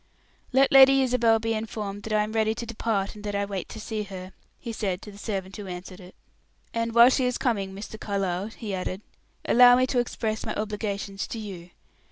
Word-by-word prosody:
"Let 270 Hz, +1 st, +4 dB
Lady 270 Hz, 0 st, +8 dB
Isabel 240 Hz, -3 st, +3 dB
be 225 Hz, 0 st, -1 dB
informed 210 Hz, -2 st, -4 dB
that 220 Hz, -, -5 dB
I 210 Hz, 0 st, +3 dB
am 210 Hz, -, -5 dB
ready 220 Hz, 0 st, +1 dB
to 235 Hz, -, -5 dB
depart, 220 Hz, -3 st, -2 dB
and 210 Hz, -, -12 dB
that 205 Hz, -1 st, -3 dB
I 200 Hz, 0 st, 0 dB
wait 195 Hz, -2 st, -5 dB
to 220 Hz, -, -8 dB
see 215 Hz, 0 st, -4 dB
her," 190 Hz, -2 st, -8 dB, 0.2 s
he 235 Hz, -, -6 dB
said 195 Hz, -5 st, -2 dB
to 210 Hz, -, -9 dB
the 200 Hz, -, -13 dB
servant 195 Hz, -3 st, -4 dB
who 205 Hz, -2 st, -7 dB
answered 180 Hz, 0 st, -8 dB
it. 180 Hz, -1 st, -13 dB, 0.6 s
"And 230 Hz, 0 st, -2 dB
while 235 Hz, +2 st, +8 dB
she 260 Hz, -, +2 dB
is 250 Hz, -1 st, 0 dB
coming, 220 Hz, -8 st, -1 dB
Mr. 215 Hz, +2 st, -8 dB
Carlyle," 195 Hz, -2 st, -2 dB
he 220 Hz, -2 st, -7 dB
added, 185 Hz, +1 st, -3 dB, 0.4 s
"allow 245 Hz, 0 st, +7 dB
me 255 Hz, +1 st, +3 dB
to 255 Hz, -1 st, 0 dB
express 220 Hz, -2 st, -2 dB
my -, -, -4 dB
obligations 205 Hz, -2 st, -3 dB
to -, -, -6 dB
you. 190 Hz, -5 st, -8 dB
215 Hz, 215 wpm, -26 LUFS, 195-230 Hz, 0.6 s, Lady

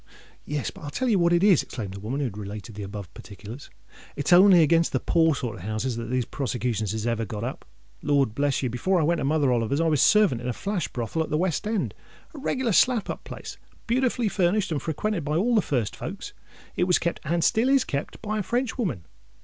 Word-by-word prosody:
"Yes: 150 Hz, -1 st, -3 dB
but -, -, -14 dB
I'll 145 Hz, -, -6 dB
tell 250 Hz, -, -1 dB
you 205 Hz, -4 st, +3 dB
what 170 Hz, 0 st, +3 dB
it 175 Hz, +1 st, +3 dB
is," 195 Hz, -6 st, +6 dB
exclaimed 105 Hz, -6 st, -6 dB
the 100 Hz, -, -7 dB
woman 120 Hz, +8 st, -3 dB
who -, -, 0 dB
had 120 Hz, -7 st, -3 dB
related 105 Hz, +1 st, -7 dB
the 105 Hz, -, -8 dB
above 100 Hz, -3 st, -7 dB
particulars; 105 Hz, -, -10 dB, 0.5 s
"it's 145 Hz, +5 st, +1 dB
only 180 Hz, -1 st, +8 dB
against 165 Hz, +2 st, +3 dB
the -, -, +2 dB
poor 165 Hz, -2 st, +2 dB
sort 120 Hz, -3 st, -4 dB
of -, -, -10 dB
houses 110 Hz, +5 st, -2 dB
that 115 Hz, 0 st, -4 dB
these 125 Hz, -1 st, 0 dB
prosecutions 120 Hz, -7 st, -2 dB
is 110 Hz, 0 st, -3 dB
ever 115 Hz, -1 st, 0 dB
got 105 Hz, +1 st, -5 dB
up. 125 Hz, -, -5 dB, 0.4 s
Lord 140 Hz, -6 st, +2 dB
bless 140 Hz, +2 st, 0 dB
you! 130 Hz, -, 0 dB
before 180 Hz, +10 st, +1 dB
I -, -, +2 dB
went 170 Hz, +2 st, +1 dB
to -, -, -2 dB
Mother 145 Hz, -1 st, +2 dB
Oliver's, 120 Hz, +4 st, 0 dB
I 165 Hz, -, +2 dB
was 150 Hz, -4 st, +2 dB
servant 210 Hz, -, +4 dB
in 125 Hz, -, -5 dB
a 125 Hz, -, -1 dB
flash 200 Hz, -, -2 dB
brothel 120 Hz, +6 st, -3 dB
at 160 Hz, -, -2 dB
the 150 Hz, -, 0 dB
West 180 Hz, +3 st, -1 dB
End—a 220 Hz, -, -5 dB
reglar 260 Hz, -4 st, -1 dB
slap 240 Hz, +1 st, +3 dB
up -, -, -8 dB
place—beautifully 245 Hz, -1 st, -3 dB
furnished, 195 Hz, 0 st, +1 dB
and 150 Hz, -, -1 dB
frequented 170 Hz, +3 st, -2 dB
by 150 Hz, +1 st, -2 dB
all 235 Hz, +7 st, +2 dB
the 220 Hz, -, +4 dB
first 125 Hz, -, -1 dB
folks. -, -, -7 dB, 0.4 s
It 180 Hz, -, +2 dB
was 180 Hz, -1 st, +4 dB
kept—and 170 Hz, 0 st, -1 dB
still 235 Hz, +7 st, +3 dB
is 275 Hz, -2 st, +4 dB
kept—by 210 Hz, +9 st, -4 dB
a -, -, +1 dB
Frenchwoman. 220 Hz, -, -2 dB
150 Hz, 220 wpm, -25 LUFS, 120-190 Hz, 0.5 s, only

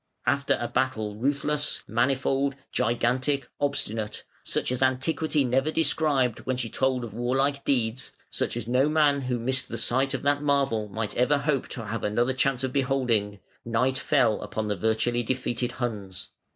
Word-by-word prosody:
After 140 Hz, 0 st, +2 dB
"a 120 Hz, -, -2 dB
battle 115 Hz, -6 st, -1 dB
ruthless, 145 Hz, +4 st, -1 dB
manifold, 135 Hz, +3 st, +1 dB, 0.2 s
gigantic, 125 Hz, +4 st, +1 dB
obstinate, 110 Hz, -6 st, -2 dB, 0.2 s
such -, -, -1 dB
as 125 Hz, -, -1 dB
antiquity 140 Hz, +3 st, +2 dB
never 135 Hz, +4 st, +1 dB
described 150 Hz, -6 st, +2 dB
when 130 Hz, -1 st, 0 dB
she 120 Hz, -3 st, -3 dB
told 130 Hz, -2 st, +1 dB
of 115 Hz, -4 st, -7 dB
warlike 135 Hz, +4 st, 0 dB
deeds, 120 Hz, -2 st, 0 dB, 0.2 s
such -, -, -1 dB
as 115 Hz, -2 st, -4 dB
no 130 Hz, +4 st, +3 dB
man 150 Hz, -2 st, +3 dB
who 125 Hz, -2 st, -1 dB
missed 125 Hz, +2 st, 0 dB
the -, -, -4 dB
sight 135 Hz, +2 st, +1 dB
of -, -, -5 dB
that 145 Hz, 0 st, +2 dB
marvel 140 Hz, -7 st, +1 dB
might 105 Hz, +1 st, -4 dB
ever 125 Hz, +4 st, +3 dB
hope 140 Hz, -2 st, 0 dB
to 115 Hz, -, -6 dB
have 115 Hz, 0 st, -4 dB
another 120 Hz, +5 st, +1 dB
chance 135 Hz, 0 st, +1 dB
of 130 Hz, -, -2 dB
beholding", 125 Hz, -7 st, 0 dB, 0.2 s
night 125 Hz, +3 st, +1 dB
fell 135 Hz, -8 st, +2 dB
upon 110 Hz, -1 st, -3 dB
the 105 Hz, -, +1 dB
virtually 110 Hz, +4 st, +1 dB
defeated 120 Hz, 0 st, -2 dB
Huns. 100 Hz, -7 st, -4 dB
130 Hz, 165 wpm, -26 LUFS, 115-140 Hz, 0.2 s, no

